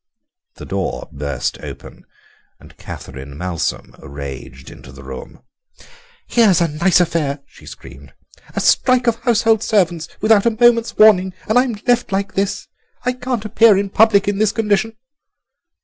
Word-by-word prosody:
The - - -10
door - - -4
burst 70 -3 -4
open - - -11 0.5
and - - -17
Catherine 70 +1 -10
Malsom 90 -1 -4
raged 65 -2 -9
into - - -14
the - - -13
room. 65 -1 -10 0.8
"Here's 215 -8 +3
a 170 - +2
nice 170 +5 +2
affair," 155 -5 -1
she - - -18
screamed, - - -13 0.4
"a - - 0
strike 255 -1 +2
of 235 -1 +1
household 225 -3 +2
servants 175 -8 0
without 215 0 +3
a 225 -2 0
moment's 235 -1 +3
warning, 190 -4 +5
and 220 +3 +3
I'm 250 -3 0
left 245 -2 +1
like 195 0 -2
this! 195 +1 -2 0.4
I 250 - +1
can't 250 -3 -4
appear 215 -1 +4
in 200 0 -2
public 205 -2 +4
in 205 -1 -1
this 215 -1 +2
condition." 220 0 -1
200 Hz, 150 wpm, -18 LUFS, 150-225 Hz, 0.8 s, warning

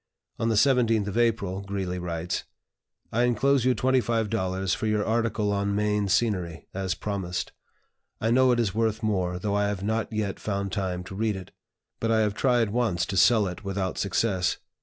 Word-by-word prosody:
On 115 - +1
the 110 - +2
17th 115 -3 +3
of 100 - -4
April 105 -5 +1
Greeley 95 -2 -3
writes: 85 -1 -3 0.7
"I 115 - +1
inclose 125 +2 +2
you 130 -1 +3
$25 110 -7 0
for 110 - -2
your 105 -1 +1
article 110 -2 0
on 100 0 0
Maine 105 -1 +1
Scenery, 90 -6 0
as 95 -2 -2
promised. 95 -4 -3 0.7
I 115 - 0
know 130 +1 +5
it 120 - +2
is 105 -5 +1
worth 110 0 0
more, 90 -4 0
though 100 +2 -2
I 105 0 +2
have 100 -2 -3
not 110 +2 -1
yet 105 -3 -2
found 100 -2 -2
time 90 -3 -2
to 95 - -9
read 110 0 0
it; 95 -1 -9 0.5
but 115 - -1
I 110 -1 +3
have 105 -2 +1
tried 120 -2 +2
once 105 -7 +1
to 100 - -4
sell 110 +3 +5
it 90 +2 -6
without 95 -1 -2
success. 95 -2 0
105 Hz, 180 wpm, -26 LUFS, 95-115 Hz, 0.7 s, know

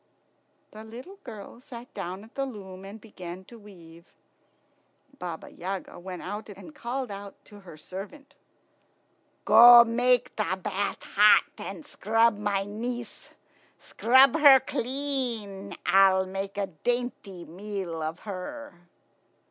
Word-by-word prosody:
The 215 +1 -11
little 250 - -11
girl 220 0 -10
sat 245 -1 -11
down 185 +3 -6
at 225 - -17
the 275 0 -2
loom 195 -5 -10
and 200 +3 -10
began 185 -4 -10
to 235 +3 -14
weave. 170 -5 -15 1.1
Baba 170 -2 -7
Yaga 185 0 -6
went 180 0 -8
out 210 +3 -6
and 205 +10 -11
called 255 -3 -4 0.3
to 205 -1 -14
her 180 -5 -13
servant, 200 - -10 1.1
"Go, 240 0 +10
make 245 +1 +1
the 190 -3 -1
bath 200 0 -3
hot 210 +1 +5 0.2
and 175 -3 -7
scrub 225 0 +1
my 205 -2 0
niece. 235 +3 -6 0.5
Scrub 260 +5 +4
her 280 -3 +9
clean. 235 -8 -3
I'll 190 -1 +5
make 195 +1 -6
a 200 - 0
dainty 200 -1 -4
meal 185 -2 -6
of 160 +2 -4
her." 200 -1 -8
205 Hz, 125 wpm, -27 LUFS, 190-240 Hz, 1.1 s, Go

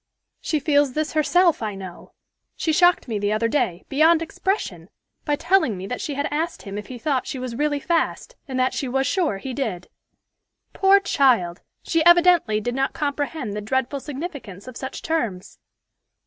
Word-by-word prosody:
She 310 - -1
feels 285 -3 +2
this 310 +2 -2
herself, 335 +1 +3
I 215 -2 -3
know. 185 -2 -10 0.4
She 320 - -1
shocked 350 -1 +4
me 220 -3 -2
the 205 0 0
other 215 +2 +1
day, 190 - -1
beyond 320 +4 +4
expression, 380 +4 -3 0.4
by 295 - +1
telling 290 - +2
me 185 - -6
that 250 +5 -4
she 290 - -4
had 285 +1 -1
asked 320 +3 -2
him 195 0 -7
if 210 -1 -6
he 255 - -7
thought 260 +1 -1
she - - -4
was 250 -2 -5
really 290 +2 0
fast, 340 - -1
and 260 -2 -3
that 255 0 +2
she 270 - -2
was 270 +2 0
sure 315 - 0
he 260 +6 -6
did. 220 -10 -4 0.8
Poor 390 +1 +5
child! 240 - +2 0.2
she 330 -1 +1
evidently 345 -10 +5
did 245 +3 -3
not 270 +1 -1
comprehend 285 -5 -3
the 210 - -4
dreadful 260 +5 -1
significance 275 - -7
of 255 - -9
such 265 +2 -6
terms." 230 - -3
275 Hz, 180 wpm, -23 LUFS, 225-320 Hz, 0.8 s, Poor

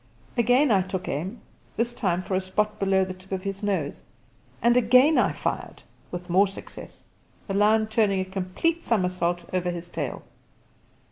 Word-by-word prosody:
Again 245 +4 +4
I 195 -3 +5
took 185 0 -4
aim, 180 - -4 0.4
this 235 +1 0
time 185 -6 -1
for 190 - -4
a 185 - +2
spot 210 +3 -1
below 195 -1 +2
the 185 - -5
tip 185 +1 -17
of 190 -1 -2
his 195 0 -4
nose, 190 -9 -2 0.6
and 235 +1 +4
again 255 +6 +5
I - - +3
fired - - -4 0.3
with 180 0 -6
more 190 +4 +4
success, 195 - -10 0.4
the 195 - -3
lion 215 +2 +4
turning 215 -3 +2
a 185 - -1
complete 190 - -1
somersault 180 - 0
over 180 -1 0
his 175 0 -5
tail. 145 -7 -4
195 Hz, 165 wpm, -25 LUFS, 185-220 Hz, 0.6 s, I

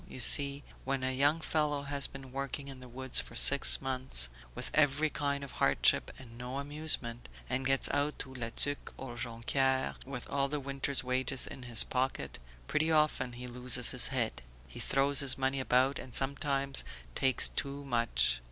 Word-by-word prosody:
You - - -10
see 140 +3 +6 0.2
when 135 0 -3
a 130 0 -1
young 145 +4 +2
fellow 150 -3 -1
has 140 0 -2
been 135 -1 -12
working 140 +1 -6
in 135 -1 -10
the 125 -1 -13
woods 130 +2 +3
for - - -9
six 140 0 +6
months, 130 - +1 0.3
with - - -5
every 150 +1 +1
kind 140 -1 -3
of 140 - -9
hardship - - +1
and 120 -3 -14
no 125 +2 -6
amusement, 140 -5 -2 0.2
and 130 +1 -2
gets 135 0 +2
out 145 +1 -2
to 130 - -7
La 120 -3 -6
Tuque 145 +4 -3
or 125 -3 -9
Jonquieres 130 +3 -2
with 130 -2 -8
all 140 0 -1
the 150 +1 -4
winter's 140 0 -1
wages 130 +1 -2
in - - -9
his 120 -3 +4
pocket, 130 +1 -4 0.3
pretty 155 - -1
often 150 -5 0
he 125 +1 -9
loses 125 0 +2
his 125 - +2
head; 115 - -2 0.3
he - - -12
throws 140 +1 +4
his 140 -2 +7
money 135 0 -1
about 130 +1 +1
and 125 - -10
sometimes 140 0 -1 0.3
takes 130 - +2
too 140 0 -6
much 115 - 0
135 Hz, 180 wpm, -30 LUFS, 125-140 Hz, 0.3 s, his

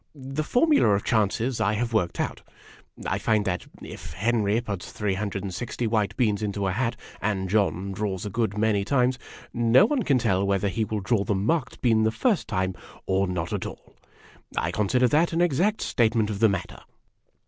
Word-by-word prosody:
The 135 +2 -4
formula 250 - +3
of 100 - -2
chances 110 +2 0
I 105 -1 +2
have 115 +2 -2
worked 90 -6 0
out. - - -2 0.6
I - - -1
find 110 -2 +1
that 90 -3 -2
' - - -19
If - - -9
Henry 105 +3 +1
puts 100 -6 -5
360 100 +3 -3
white 110 -2 0
beans 110 -5 +1
into 100 -1 -2
a 95 - +1
hat, 115 +4 -1 0.3
and 95 -3 -1
John 100 -1 0
draws 95 -1 -3
a 105 - -4
good 110 -2 -1
many 105 -2 +2
times, 125 +3 +1 0.3
no 120 - +5
one 265 +3 0
can 140 - +2
tell 100 -6 +1
whether 100 0 +1
he 110 +3 -1
will 105 -1 -3
draw 100 +1 +1
the 105 -1 0
marked 125 +8 -1
bean 115 -3 +3
the 110 - +3
first 210 - 0
time, 95 -3 -1 0.3
or 95 +1 +1
not 85 -2 -3
at - - -2
all.' - - -12 0.6
I - - 0
consider 125 +5 +2
that 165 +5 +2
an 165 - +1
exact 175 +6 +2
statement 110 -3 +1
of 100 - -4
the 110 0 +5
matter." 100 -3 -4
110 Hz, 190 wpm, -25 LUFS, 100-120 Hz, 0.6 s, no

